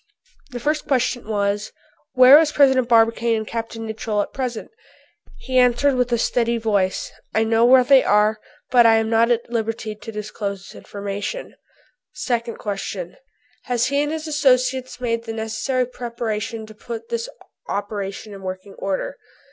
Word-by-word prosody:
The 245 -3 -6
first 300 +4 -1
question 250 -3 0
was, 205 0 -1 0.4
"Where 255 +3 +9
is 315 -2 +2
President 265 -4 +4
Barbicane 230 0 +3
and 220 - -4
Capt. 230 0 -5
Nicholl 220 -2 -2
at - - -12
present?" 250 -4 -4 0.7
He 260 -1 0
answered 250 +3 +3
with 250 -1 0
a 235 - +3
steady 235 0 +1
voice, 205 -4 0 0.2
"I 220 - +3
know 225 +1 +3
where 255 +1 +7
they 270 +1 +6
are, 210 +1 +3 0.3
but 240 -2 +6
I 225 - +6
am 225 0 0
not 230 +1 +4
at 235 0 0
liberty 225 -1 -2
to 210 +2 -10
disclose 210 -2 -5
this - - -13
information." 205 - -6 0.6
Second 235 -2 -2
question: 195 -3 -5 0.5
"Have 245 -2 0
he 280 +2 +1
and 295 0 -1
his 315 0 -4
associates 255 -3 +1
made 230 -2 -2
the 225 - -5
necessary 225 +3 -1
preparations 230 -2 -5
to - - -11
put 235 - -8
this 470 +1 -3 0.4
operation 205 0 -4
in 195 - -10
working 185 +1 -7
order?" 195 -1 -3
230 Hz, 160 wpm, -21 LUFS, 215-255 Hz, 0.7 s, Where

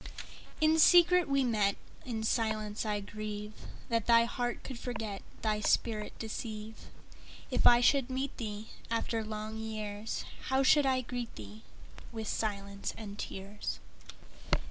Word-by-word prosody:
In 315 0 +4
secret 350 +1 +7
we 275 -1 +3
met:In 220 +1 -1
silence 220 -1 0
I 205 -1 -1
grieveThat 215 +2 -5
thy 230 0 +6
heart 240 0 -2
could 260 -3 -6
forget, 225 -5 -4 0.2
Thy 215 -1 +1
spirit 215 0 0
deceive. 220 -1 -6 0.6
If - - +4
I 240 0 +7
should 270 0 +4
meet 265 +1 -2
theeAfter 225 +1 -3
long 215 0 -5
years, 215 -1 -4 0.2
How 265 +1 +2
should 285 +1 +5
I 260 -1 +2
greet 245 -1 -5
thee?—With 110 - -10
silence 200 -2 -3
and 205 -2 -8
tears. 200 +2 -5
220 Hz, 120 wpm, -32 LUFS, 210-245 Hz, 0.6 s, secret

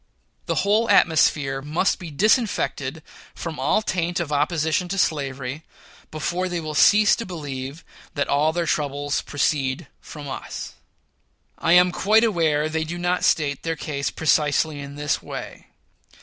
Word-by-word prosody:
The - - 0
whole 215 +3 +2
atmosphere 145 -4 +3
must 155 +7 0
be 175 - -7
disinfected 215 - 0 0.3
from - - -6
all 215 - +2
taint 175 -3 -1
of 165 -4 -3
opposition 155 +3 0
to 195 +2 -3
slavery, 140 -4 -1 0.5
before 175 +4 -2
they 175 -1 -2
will 155 -1 -5
cease 210 +7 +5
to 230 - -4
believe 145 - -7 0.3
that 145 - 0
all 150 +2 +2
their 170 +1 -1
troubles 145 -1 -1
proceed 145 +1 -1
from 150 -2 -10
us. 135 - -6 0.9
I - - +3
am 180 0 +6
quite 215 +5 +3
aware 160 -8 +2
they 160 0 -1
do 165 +2 -5
not 175 +1 0
state 145 -3 +1
their 165 0 -2
case 140 -4 -3
precisely 150 -1 +1
in 140 0 -8
this 150 0 -1
way. - - -8
155 Hz, 150 wpm, -23 LUFS, 145-175 Hz, 0.9 s, am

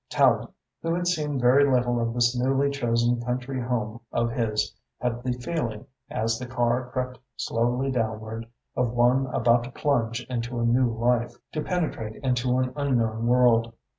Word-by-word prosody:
Tallente, - - +3 0.3
who 165 0 0
had 175 0 -1
seen 150 -6 0
very 125 +3 +5
little 120 -2 +2
of 115 0 -1
this 120 0 +3
newly 135 +3 +2
chosen 120 -2 +1
country 125 +2 -3
home 115 -2 -2
of 115 0 0
his, 105 -3 -1 0.2
had 120 -1 -2
the 125 0 -1
feeling, 125 -3 -3 0.2
as 115 +1 -1
the 125 - -6
car 120 0 0
crept 125 -1 -3 0.2
slowly 125 +4 0
downward, 110 -1 -3 0.3
of 120 -2 0
one 125 +2 +3
about 120 -1 +3
to - - -7
plunge 120 -4 0
into 120 -1 -3
a 115 - +1
new 120 +1 +3
life, 120 +1 +1 0.2
to 155 - -2
penetrate 150 - -2
into 125 -1 +1
an 130 0 0
unknown 115 -5 0
world. 120 -2 +4
120 Hz, 165 wpm, -26 LUFS, 115-130 Hz, 0.3 s, very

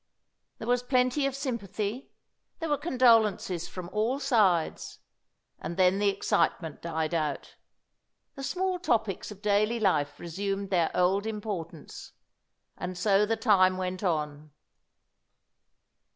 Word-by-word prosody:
There 225 - -7
was 245 0 +2
plenty 255 +2 +1
of 270 - -3
sympathy; 235 -3 -4 0.5
there 325 -2 -4
were 295 - +2
condolences 225 - +3
from 180 -2 -7
all 225 +6 0
sides. 210 - +1 0.6
And 170 - -6
then 185 +1 +4
the 205 0 +3
excitement 180 -4 0
died 160 -1 -2
out; 155 -4 -2 0.8
the 275 - -9
small 365 +5 -1
topics 220 - -1
of 210 0 -11
daily 210 +3 +2
life 150 -8 +1
resumed 195 +3 -4
their 170 -3 +2
old 190 +4 +2
importance. 195 -8 -6 0.7
And 180 0 -5
so 200 +2 +3
the 225 +1 0
time 190 -5 +4
went 185 0 -3
on. 150 -4 -2
200 Hz, 125 wpm, -28 LUFS, 180-235 Hz, 0.8 s, then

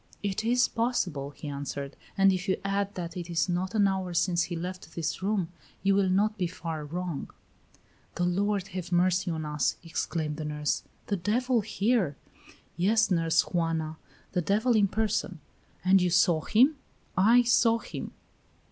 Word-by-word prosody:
"It 200 +1 -1
is 245 +2 +3
possible," 185 - -1
he 150 +1 -9
answered; 140 0 -5 0.2
"and 195 0 +5
if 185 +2 -3
you 190 - +2
add 200 0 -1
that 175 0 -5
it 175 -1 -6
is 170 +1 +1
not 180 +3 -2
an 205 -2 +4
hour 190 -2 -2
since 170 0 +2
he 175 - -5
left 180 -1 -6
this 165 +1 -2
room, 195 -3 0 0.3
you 195 0 +4
will 195 -1 +3
not 210 +3 +1
be 180 - +1
far 165 -3 -5
wrong." 170 0 -4 0.9
"The 175 - -1
Lord 195 +2 0
have 180 -2 -6
mercy 180 +1 +2
on 160 -2 -3
us!" 150 -1 0
exclaimed 160 -2 -3
the 155 - -4
nurse: 150 0 -1 0.2
"the 200 - -1
devil 235 +6 +1
here!" 210 - +1 0.6
"Yes, 205 +5 +2
Nurse 165 -2 +3
Juana, 165 -2 -1 0.3
the 180 - 0
devil 220 +7 +2
in 205 -2 +4
person." 210 -4 -1 0.5
"And 190 0 +6
you 180 - +2
saw 175 -2 +4
him?" 260 - +4 0.4
"I 230 +6 +6
saw 230 -1 +4
him." - - -7
185 Hz, 165 wpm, -28 LUFS, 165-205 Hz, 0.9 s, And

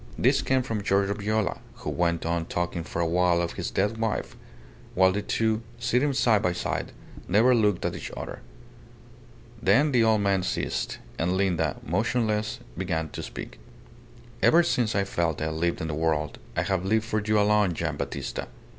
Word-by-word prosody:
This - - +3
came 130 -1 +1
from 110 -4 -3
Giorgio 100 0 +2
Viola, 105 -2 -1 0.2
who - - -5
went 85 -2 0
on 85 0 -1
talking 85 -1 -2
for 85 - -5
a - - +1
while 90 +1 +3
of 85 0 -1
his - - -3
dead 105 +3 0
wife; 110 -2 -2 0.6
while 95 0 +5
the 105 +2 -1
two, 110 +1 0 0.2
sitting 125 +5 +1
side 115 -6 +3
by 90 -4 +1
side, 90 - -3 0.4
never 110 +7 +5
looked 105 -6 +2
at - - 0
each - - -6
other. - - -6 1.2
Then 135 +11 +4
the 120 -3 +4
old 110 -2 +3
man 100 -2 +2
ceased; - - -2 0.2
and 90 +3 +1
Linda, 85 -6 +1
motionless, 110 +4 0 0.2
began 80 -3 -2
to - - -6
speak. - - -8 0.8
"Ever 170 +2 +6
since 120 -7 +1
I 100 - +3
felt 85 -5 -1
I 80 - -1
lived 85 +2 -1
in 80 - -2
the 75 - -3
world, 75 -1 -1 0.2
I - - +2
have 95 -2 0
lived 110 +3 +1
for 110 -2 -1
you 110 0 +2
alone, 105 -3 +3
Gian' - - -2
Battista. - - -4
100 Hz, 180 wpm, -26 LUFS, 85-110 Hz, 1.2 s, Ever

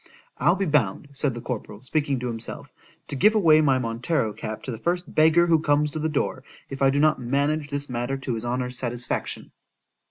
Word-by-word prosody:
I'll 170 +7 +4
be 195 0 -1
bound, 145 - +1
said 135 -2 -1
the 120 - -6
corporal, 115 -2 -6
speaking 140 -1 0
to 125 - -2
himself, 115 -1 -6 0.3
to - - -3
give 210 +11 +4
away 160 -7 +6
my 135 -4 +3
Montero 115 0 -1
cap 110 +1 -6
to 130 - -4
the 115 - -6
first 175 +5 -2
beggar 160 +2 +5
who 165 -2 +4
comes 150 0 +2
to 155 - -4
the 160 +1 0
door, 140 -3 -2 0.3
if 135 - -6
I 135 - +5
do 135 - 0
not 155 -2 +3
manage 145 +4 0
this 145 0 -3
matter 120 +2 -2
to 135 -2 -3
his 110 - -3
honour's 125 0 -2
satisfaction. 120 -1 -3
135 Hz, 210 wpm, -25 LUFS, 120-155 Hz, 0.3 s, away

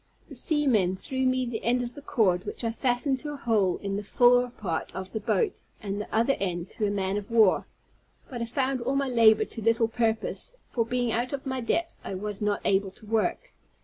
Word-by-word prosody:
The - - -10
seamen 245 - +2
threw 260 +6 -2
me 255 0 +1
the 235 -2 -4
end 245 +1 +2
of 240 0 -5
the 290 - -10
cord, 195 -11 +1
which - - -5
I 230 - 0
fastened 250 +3 0
to 295 +1 -5
a - - -7
hole 210 -8 +1
in 195 0 -2
the 205 - -4
fore 245 +3 +4
part 185 -9 -4
of 190 0 -6
the 220 - -3
boat, 405 - 0 0.2
and 205 -1 -4
the - - -8
other 235 +5 +2
end 175 -2 -2
to 215 -3 -1
a - - 0
man 195 -1 -1
of 205 -1 -6
war. 220 -5 +4 0.6
But 245 -3 -6
I - - 0
found 260 +1 -1
all 260 +3 -1
my 275 -1 +1
labor 220 -3 +5
to 225 - -8
little 230 +1 +3
purpose; 225 - -2
for, 230 -2 -1
being 245 -1 0
out 240 +4 -1
of 275 0 -4
my 260 -1 -2
depth, 335 +8 -1
I 195 - -5
was 205 +2 -5
not 210 -1 0
able 195 0 +2
to 195 - -15
work. 225 - -1
230 Hz, 225 wpm, -27 LUFS, 205-255 Hz, 0.6 s, labor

